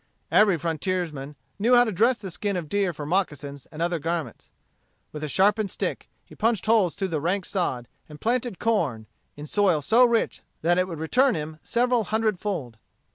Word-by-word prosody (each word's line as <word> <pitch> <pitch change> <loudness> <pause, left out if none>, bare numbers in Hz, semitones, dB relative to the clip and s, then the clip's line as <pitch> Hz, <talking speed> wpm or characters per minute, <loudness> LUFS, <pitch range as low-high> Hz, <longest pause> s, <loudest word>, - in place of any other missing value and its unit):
Every 205 -4 +5
frontiersman 160 -3 -3 0.2
knew 240 +5 +4
how 245 - +7
to 225 - -2
dress 230 +6 +3
the 195 -4 -7
skin 200 +2 -2
of 170 -3 -4
deer 200 +2 0
for 150 -2 -7
moccasins 145 -5 -2
and 160 +1 -4
other 170 -1 0
garments. 165 +1 -4 0.6
With 150 0 -7
a - - -1
sharpened 200 +6 +2
stick - - -4 0.2
he - - -16
punched 225 -3 0
holes 215 -6 +3
through 195 -1 -2
the 155 -4 -2
rank 180 +4 0
sod, 150 -11 -2 0.2
and 150 -1 -11
planted 240 -1 -1
corn, 160 - 0 0.3
in 145 - -8
soil 185 -1 +2
so 225 - +4
rich 235 -2 +1 0.2
that 175 +2 +3
it 185 - +1
would 170 -3 -6
return 250 - +2
him 155 0 -5
several 245 -1 +1
hundred 215 -3 0
fold. 155 - -4
180 Hz, 185 wpm, -25 LUFS, 155-215 Hz, 0.6 s, how